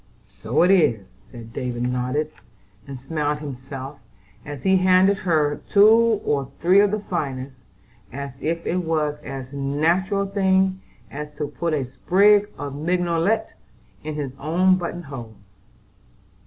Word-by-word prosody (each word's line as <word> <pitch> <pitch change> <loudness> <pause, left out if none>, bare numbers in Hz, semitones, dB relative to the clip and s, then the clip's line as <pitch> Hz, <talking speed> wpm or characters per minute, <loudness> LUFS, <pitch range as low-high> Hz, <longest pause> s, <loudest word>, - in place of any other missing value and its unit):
"So 115 - +2
it 180 - +4
is!" 110 - +1
and 115 -2 -11
David 120 -1 -3
nodded, 125 +5 -1 0.6
and 135 -2 -7
smiled 150 +2 -2
himself, 135 -1 -8 0.4
as 145 -3 -8
he 190 0 +4
handed 185 +2 +4
her 155 -6 0
two 220 +2 +5
or 140 -2 0
three 185 +4 +5
of 205 0 +5
the 210 +1 -2
finest, 135 -8 -4 0.5
as 140 0 -7
if 165 +1 -2
it 180 - 0
was 155 -4 -1
as 135 -2 -8
natural 165 +8 0
a - - 0
thing 190 -1 +1 0.3
as 150 +1 -6
to 150 -1 -4
put 160 +2 -2
a 140 -3 -1
sprig 200 +10 +3
of 140 0 -5
mignonette 175 +7 0 0.5
in 155 0 -5
his 145 -3 -4
own 175 +6 +3
button 175 -1 -5
hole. 120 -7 -9
150 Hz, 140 wpm, -23 LUFS, 135-185 Hz, 0.6 s, two